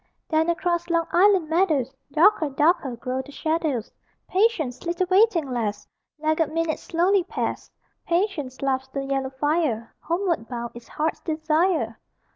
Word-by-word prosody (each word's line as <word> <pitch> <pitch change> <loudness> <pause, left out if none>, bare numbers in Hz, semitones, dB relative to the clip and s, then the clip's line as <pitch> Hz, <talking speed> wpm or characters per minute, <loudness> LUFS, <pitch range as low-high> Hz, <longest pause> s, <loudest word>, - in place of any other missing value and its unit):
(Then, 320 +1 +2
across 345 0 0
Long 335 -1 +2
Island 375 -2 +4
meadows, 310 -6 +1 0.2
Darker, 315 0 +4
darker, 285 -2 +2
grow 255 +2 -3
the 275 +2 -13
shadows: 315 -7 -1 0.4
Patience, 370 - +1
little 345 +2 0
waiting 375 -6 +4
lass! 210 -4 -2 0.3
Laggard 310 0 +1
minutes 330 0 -1
slowly 360 +3 +2
pass; 370 - -4 0.4
Patience, 335 -8 -1
laughs 265 -1 0
the 275 +1 -4
yellow 270 -1 -1
fire: 270 -4 -1
Homeward 340 - -1
bound 235 -1 -4
is 240 0 -12
heart's 310 +1 -2
desire!) 315 -6 0
315 Hz, 135 wpm, -24 LUFS, 265-345 Hz, 0.4 s, Island